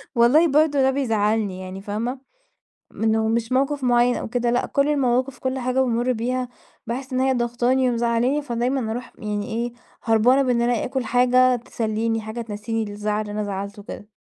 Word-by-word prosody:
والله 265 +9 +5
برضه 295 -1 +3
ده 265 0 +4
بيزعلني 215 -6 0
يعني 185 +1 -7
فاهمة؟ 230 +6 -3 0.7
منه 220 0 0
مش 230 +2 -1
موقف 275 +1 +1
معين 245 0 +3
أو - - -4
كده 240 0 0
لأ 245 - +1
كل 280 +1 +1
المواقف 260 -2 +1
كل 260 0 -2
حاجة 255 +1 0
بامُر 245 0 +1
بيها 250 +2 -2 0.4
باحس 260 +3 -5
إن 255 - 0
هي 265 0 +3
ضاغطاني 245 +2 +1
ومزعلاني، 240 +4 +1
فدايمًا 245 -2 -1
أروح 245 +2 -6
يعني 210 -1 -3
إيه 235 +2 -3 0.3
هربانة 235 +4 +4
بإن 245 -2 +1
أنا 240 -1 +1
آكُل 260 -1 -2
حاجة 250 +1 +4
تسلِّيني 225 -1 -2
حاجة 220 +2 -6
تنسيني 225 0 -3
الزعل 210 +1 -2
اللي 210 -1 -5
أنا 210 0 -2
زعلته 200 +1 -5
وكده. 205 +1 -10
240 Hz, 175 wpm, -23 LUFS, 220-255 Hz, 0.7 s, والله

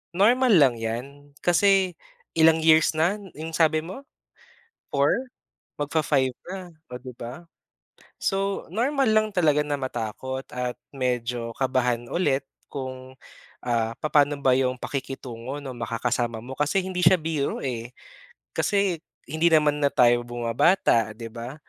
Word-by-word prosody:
normal 245 +6 +4
lang 140 -7 +5
'yan. 140 +6 -6
Kasi 190 +1 +3 0.4
ilang 160 0 +5
years 160 0 +5
na 175 +7 +1 0.2
yung 160 +2 -6
sabi 155 -1 +2
mo? 190 +12 -8 0.9
4? 140 0 +3 0.7
Mag-fa-five 145 -3 +1 0.2
na, 185 -2 -7 0.2
o 125 - -4
'di 125 0 -9
ba. 125 +9 -8 0.8
So 195 0 -1
normal 265 - +1
lang 215 0 +4
talaga 150 -4 +3
na 145 - -1
matakot 130 +1 -4
at 125 -1 -3 0.2
medyo 125 -2 -2
kabahan 125 -3 0
ulit, 145 -6 +1 0.3
kung 130 -1 -7 0.5
ah 115 -2 0
papa'no 145 -1 +2
ba 130 -2 +4
yung 130 -1 +1
pakikitungo 130 -1 -5
nung 130 -3 -7
makakasama 120 0 -1
mo. 130 +3 -7
Kasi 150 +6 +1
hindi 185 -1 -3
siya 180 +2 +7
biro 155 -3 -2
eh. 120 -3 -4 0.7
Kasi 200 -4 +1 0.3
hindi 160 +4 +1
naman 150 -3 +4
na 145 - +3
tayo 120 -1 +4
bumabata 120 - +2
'di 115 0 -7
ba, 120 +3 -7
140 Hz, 135 wpm, -25 LUFS, 125-165 Hz, 0.9 s, siya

